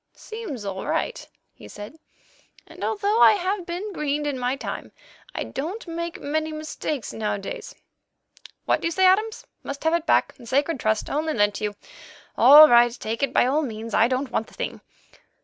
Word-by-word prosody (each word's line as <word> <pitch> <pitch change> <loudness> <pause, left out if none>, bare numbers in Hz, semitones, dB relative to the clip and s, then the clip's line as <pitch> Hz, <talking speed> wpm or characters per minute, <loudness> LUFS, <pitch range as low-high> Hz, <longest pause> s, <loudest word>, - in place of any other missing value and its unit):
"Seems 390 - -7
all 195 -1 -5
right," - - -2 0.3
he - - -14
said, 210 +10 -10 0.7
"and - - -11
although 425 +1 0
I - - +8
have 380 -1 -2
been 375 +4 -5
greened 295 -2 -2
in 285 -3 -2
my 250 +1 0
time, 275 - -6 0.4
I - - -2
don't 350 - -5
make 335 0 -5
many 315 +2 -2
mistakes 310 -3 -5
nowadays. 210 -2 -4 0.9
What - - +1
do - - 0
you - - -2
say, 375 +2 +2
Adams? 430 +4 +2 0.2
Must 280 0 -7
have 320 +1 +2
it 340 -1 -1
back? - - +3
A 240 - -13
sacred 280 +4 0
trust! 215 -1 0
Only 310 +2 -1
lent 205 -1 +2
to 215 - -3
you! 205 0 -4 0.6
All 295 +5 +9
right, 240 -1 +6
take 230 -1 -5
it 275 - +1
by - - +3
all 280 +5 +1
means. 225 -5 -6
I 230 - +4
don't 255 0 -2
want 220 - -1
the - - -17
thing. - - -5
295 Hz, 185 wpm, -24 LUFS, 240-340 Hz, 0.9 s, All